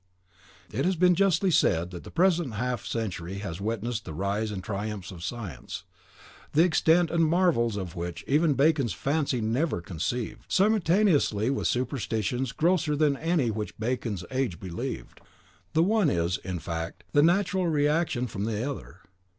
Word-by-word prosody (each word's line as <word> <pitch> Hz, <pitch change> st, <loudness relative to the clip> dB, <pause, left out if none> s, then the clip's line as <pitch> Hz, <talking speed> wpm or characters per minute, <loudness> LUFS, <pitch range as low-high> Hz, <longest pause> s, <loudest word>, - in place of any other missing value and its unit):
It -, -, -1 dB
has 185 Hz, +1 st, +2 dB
been 180 Hz, +1 st, +5 dB
justly 195 Hz, 0 st, +3 dB
said 85 Hz, -, +2 dB
that 90 Hz, -, -8 dB
the -, -, -10 dB
present 170 Hz, -, +2 dB
half 125 Hz, 0 st, -2 dB
century 95 Hz, -5 st, -3 dB
has 100 Hz, -3 st, -5 dB
witnessed 115 Hz, +2 st, -2 dB
the 80 Hz, -, -7 dB
rise 100 Hz, +4 st, -1 dB
and 95 Hz, -3 st, -5 dB
triumphs 100 Hz, -2 st, -4 dB
of 85 Hz, -3 st, -9 dB
science, 95 Hz, -, -6 dB, 0.7 s
the 160 Hz, -, +6 dB
extent 170 Hz, 0 st, +3 dB
and 165 Hz, 0 st, +3 dB
marvels 160 Hz, -, +2 dB
of 95 Hz, -3 st, -5 dB
which 85 Hz, -1 st, -5 dB
even 150 Hz, +1 st, +3 dB
Bacon's 140 Hz, -, +3 dB
fancy 140 Hz, -, 0 dB
never 115 Hz, -, 0 dB
conceived, 90 Hz, +8 st, -3 dB
simultaneously 185 Hz, -, +3 dB
with 135 Hz, -, 0 dB
superstitions 125 Hz, -1 st, -1 dB
grosser 160 Hz, -2 st, +1 dB
than 145 Hz, -1 st, +3 dB
any 155 Hz, -5 st, +1 dB
which 105 Hz, 0 st, -5 dB
Bacon's 110 Hz, -5 st, -2 dB
age 130 Hz, -10 st, -1 dB
believed. 85 Hz, -9 st, -6 dB, 0.5 s
"The 160 Hz, -, +4 dB
one 205 Hz, -3 st, +3 dB
is, 85 Hz, -4 st, 0 dB
in 95 Hz, -1 st, -4 dB
fact, 80 Hz, 0 st, -5 dB
the 145 Hz, -, +5 dB
natural 185 Hz, +2 st, +2 dB
reaction 150 Hz, -4 st, +1 dB
from 105 Hz, -3 st, -4 dB
the 110 Hz, +3 st, -2 dB
other. -, -, -10 dB
125 Hz, 155 wpm, -27 LUFS, 100-160 Hz, 0.7 s, the